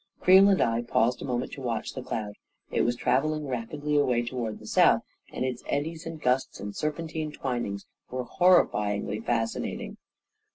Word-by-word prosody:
Creel 190 +2 +7
and 195 - +3
I 115 0 +2
paused 120 +1 +1
a - - -4
moment 125 -1 -2
to 140 - -8
watch 120 -3 -3
the 130 - -5
cloud. 110 -4 -4 0.4
It - - +1
was 120 - +1
travelling 150 +5 +1
rapidly 145 +4 -3
away 125 -4 +2
toward 120 -3 -3
the - - -14
south, - - +4 0.3
and - - -2
its 125 -2 -3
eddies 160 +4 -2
and 165 -1 -6
gusts 130 -1 0
and 100 0 -6
serpentine 155 0 -3
twinings 120 -8 -3 0.2
were 125 0 -3
horrifyingly 105 - +2
fascinating. 115 -1 -2
125 Hz, 165 wpm, -27 LUFS, 115-150 Hz, 0.4 s, Creel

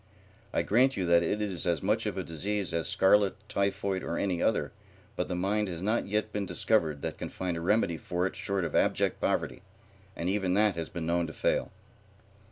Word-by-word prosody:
I - - +1
grant 130 +5 +3
you 95 - 0
that 85 0 +5
it 105 +5 0
is 95 -4 -3
as 85 -3 0
much - - +1
of - - -3
a - - -1
disease 100 +3 -2
as 85 -1 0
scarlet, 100 0 +4
typhoid, 100 -1 -1
or 85 - -3
any 90 -4 0
other, - - +1 0.4
but - - -1
the 90 - -2
mind 100 +4 0
has 85 -3 -5
not 110 +4 0
yet 105 +1 -1
been 100 -2 -2
discovered 80 -10 +1
that - - -4
can - - -4
find 90 -2 -3
a 85 - -4
remedy 90 -2 +2
for 90 +3 -2
it 95 - -3
short 100 -3 -1
of 80 - -4
abject - - +1
poverty, - - -1 0.5
and 85 - -3
even 95 -1 +1
that 105 -2 +3
has 85 -1 -4
been 85 -2 -5
known 85 0 +1
to 80 - -8
fail." - - 0
95 Hz, 210 wpm, -29 LUFS, 85-105 Hz, 0.5 s, that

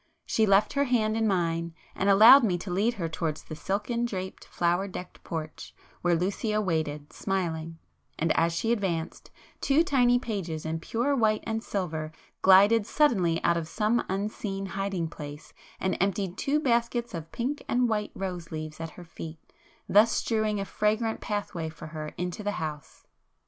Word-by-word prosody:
She 220 -1 +2
left 195 +1 +4
her 280 0 +2
hand 220 -4 +1
in 225 0 +1
mine, 170 -3 0 0.2
and 195 - 0
allowed 225 +7 +9
me 185 -6 +2
to 180 +1 -6
lead 210 +7 +1
her 170 -5 -2
towards 160 -1 -3
the 155 - -8
silken 210 +8 -2
draped, 190 -5 -4
flower 175 +3 0
decked 180 -1 -9
porch, 155 -2 -6 0.3
where 175 -1 +3
Lucio 205 +5 0
waited, 155 -6 -2
smiling,—and 165 -3 -3
as 165 +1 +3
she 200 +7 -1
advanced, 185 -8 -2 0.3
two 290 +4 +4
tiny 245 -6 +4
pages 190 -10 -4
in 160 +1 -2
pure 240 +11 0
white 215 -4 +2
and 225 0 -2
silver 160 -5 -3 0.3
glided 200 +3 +6
suddenly 190 - +2
out 170 0 +3
of 165 -1 -3
some 220 +6 +1
unseen 195 0 -3
hiding 195 -2 -2
place, 150 -2 -9 0.3
and 190 - 0
emptied 195 -1 0
two 285 +7 +1
baskets 235 -3 0
of 165 -1 -6
pink 265 +5 -3
and 245 0 +2
white 210 -2 -1
rose 180 -3 -5
leaves 155 0 -6
at 165 0 -4
her 175 - -10
feet, 165 -1 -8 0.5
thus 215 +3 +5
strewing 215 -2 0
a 195 - -2
fragrant 220 +3 0
pathway 200 -6 -3
for 160 - -10
her 155 -1 -6
into 180 +3 -3
the 205 0 -2
house. 155 -6 -6
195 Hz, 165 wpm, -28 LUFS, 165-220 Hz, 0.5 s, allowed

